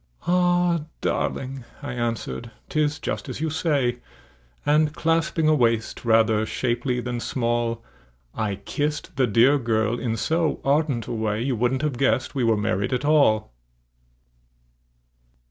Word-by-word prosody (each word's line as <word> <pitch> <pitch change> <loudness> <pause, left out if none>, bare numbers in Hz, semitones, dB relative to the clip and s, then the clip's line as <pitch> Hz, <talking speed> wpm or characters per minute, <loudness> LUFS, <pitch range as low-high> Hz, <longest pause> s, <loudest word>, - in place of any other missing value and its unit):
"Ah! 175 -2 +2 0.2
darling," 135 -1 -2 0.2
I 140 -4 -4
answered, 120 -1 -3 0.2
"'tis 150 -1 +1
just 150 - -4
as - - -5
you 160 0 -1
say;" 140 -6 0 0.7
And 150 0 +3
clasping 165 0 +1
a 155 - +5
waist 115 -5 +1
rather 110 -2 +3
shapely 120 +2 -1
than 120 0 -3
small, 120 -1 -1 0.5
I 105 -3 -2
kissed 145 +9 -3
the 130 -1 +2
dear 120 +7 +4
girl 115 -1 0
in 115 -3 -2
so 160 +5 0
ardent 140 -4 +1
a 120 - -5
way 110 0 -1
You 130 -1 0
wouldn't 125 +4 0
have 140 -5 -1
guessed 130 -1 +1
we 135 -3 -1
were 115 -2 +3
married 105 +2 -1
at 125 +3 -1
all! 125 - +3
125 Hz, 140 wpm, -24 LUFS, 115-150 Hz, 0.7 s, a